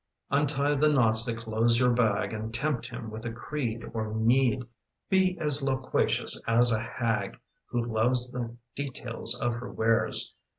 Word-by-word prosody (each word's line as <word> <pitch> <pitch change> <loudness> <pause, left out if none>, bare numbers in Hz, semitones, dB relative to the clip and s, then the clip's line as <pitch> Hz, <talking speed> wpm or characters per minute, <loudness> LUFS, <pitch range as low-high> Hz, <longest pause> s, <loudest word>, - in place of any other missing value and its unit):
Untie 145 0 +1
the 150 +2 +3
knots 115 -5 +3
that 115 -2 -3
close 115 +1 +1
your 125 -1 +4
bag 115 -3 +1
And 110 +1 -5
tempt 145 +1 -1
him 110 -2 -7
with 110 +1 -8
a 115 - -4
creed 115 -1 -4
or 110 -1 -3
need. 120 +3 +2 0.5
Be 190 -1 +3
as 150 -2 +1
loquacious 130 -1 +1
as 120 +1 +5
a 110 -1 +1
hag 115 -1 -2 0.3
Who 120 -1 -2
loves 120 +2 +1
the 120 -2 -5 0.2
details 125 -4 -1
of 120 -1 0
her 120 +1 -6
wares. 115 0 +2
120 Hz, 160 wpm, -28 LUFS, 115-135 Hz, 0.5 s, as